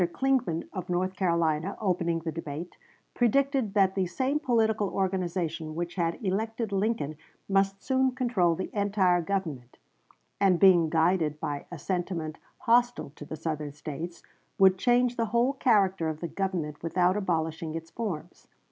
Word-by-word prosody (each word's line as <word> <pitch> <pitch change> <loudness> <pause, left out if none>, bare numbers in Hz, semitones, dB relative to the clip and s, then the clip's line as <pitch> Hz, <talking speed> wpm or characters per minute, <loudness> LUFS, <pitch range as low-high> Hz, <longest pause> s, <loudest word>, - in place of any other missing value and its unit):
Clingman, 255 -12 0
of 185 -3 -5
North 185 +1 0
Carolina, 170 0 0
opening 170 -4 0
the 160 0 -3
debate, 160 +1 -6 0.4
predicted 260 -2 +1
that 190 -2 +4
the 190 -2 0
same 260 +11 0
political 220 -6 +1
organization 180 -5 -2
which 175 +1 -3
had 170 -2 -1
elected 220 +3 -1
Lincoln 195 -7 -1 0.3
must 195 0 +1
soon 265 -1 +2
control 215 -10 +2
the 190 - -5
entire 195 -4 +2
Government, 160 -10 -4 0.6
and 185 -3 +4
being 175 -4 +6
guided 160 -2 +2
by 145 -3 -4
a 175 - -6
sentiment 170 -1 -3 0.2
hostile 240 - +2
to 145 - -9
the 155 - -6
Southern 155 -2 -4
States 160 +3 -7 0.3
would 190 -1 +5
change 245 +1 +3
the 230 - +1
whole 235 +5 +2
character 195 - +2
of 155 -1 -5
the 170 - -3
Government 175 -6 -3
without 180 +2 +2
abolishing 165 -4 -2
its 165 0 -7
forms. 205 -10 -5
185 Hz, 150 wpm, -28 LUFS, 165-210 Hz, 0.6 s, being